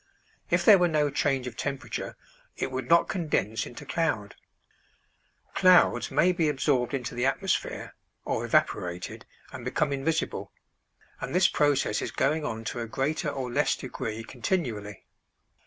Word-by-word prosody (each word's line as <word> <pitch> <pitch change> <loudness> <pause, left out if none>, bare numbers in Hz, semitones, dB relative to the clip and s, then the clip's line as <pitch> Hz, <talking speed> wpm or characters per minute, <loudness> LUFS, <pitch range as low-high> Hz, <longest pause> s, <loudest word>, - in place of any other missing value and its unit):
If - - +2
there 205 -4 +9
were 175 - +4
no 150 -3 +1
change 135 -2 0
of 125 -3 -6
temperature, 135 +1 -4 0.4
it - - -2
would 130 0 -4
not 170 0 +5
condense 145 - -1
into 120 - -10
cloud. 115 -12 -1 1.2
Clouds 185 -1 +5
may 180 - +3
be 170 -4 +1
absorbed 135 -3 +1
into 125 -4 -4
the 120 +2 +1
atmosphere 190 +7 -1 0.3
or - - -1
evaporated 90 0 -1 0.2
and - - -8
become 140 +3 0
invisible; 140 +4 -2 0.7
and - - -4
this 180 0 +6
process 145 -7 +1
is - - -3
going 155 0 0
on 110 -4 -4
to 120 - -4
a 115 - -3
greater 140 +6 -1
or 130 -3 -4
less 145 +4 +2
degree 115 -4 -5
continually. 115 - -3
135 Hz, 145 wpm, -27 LUFS, 120-160 Hz, 1.2 s, there